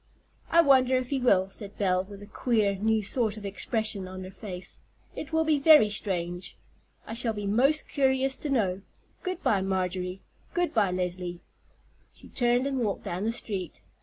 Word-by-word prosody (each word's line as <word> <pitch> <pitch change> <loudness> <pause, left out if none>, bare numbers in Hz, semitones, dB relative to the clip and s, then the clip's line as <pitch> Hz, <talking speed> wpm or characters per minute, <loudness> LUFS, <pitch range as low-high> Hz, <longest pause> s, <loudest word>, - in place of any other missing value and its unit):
"I 335 - +6
wonder 260 -4 +4
if 255 +1 -4
he 275 - +1
will," 195 -7 +3
said 200 0 -8
Belle, 185 -2 +1
with 200 +1 -11
a - - -9
queer, 215 -1 +1
new 215 +2 +1
sort 220 0 0
of 210 - -8
expression 205 0 -2
on 185 0 -7
her 185 - -8
face. 185 -3 -7 0.4
"It 310 - -6
will 320 0 +2
be 310 -2 +2
very 290 -7 +7
strange. 175 -3 -3 0.5
I - - -6
shall 230 -1 +1
be 205 -1 -5
most 265 +9 +3
curious 265 -1 +2
to 300 - -5
know. 200 -8 +1 0.4
Good 370 -1 -4
by, 200 -4 +2
Marjorie—good 190 - -3
by, 210 -4 +3
Leslie." 180 -1 -3 0.7
She - - -14
turned 245 +1 +2
and 275 -1 -1
walked 215 -5 -1
down 180 +4 -3
the 225 - +1
street. 195 -7 -2
210 Hz, 175 wpm, -28 LUFS, 190-260 Hz, 0.7 s, very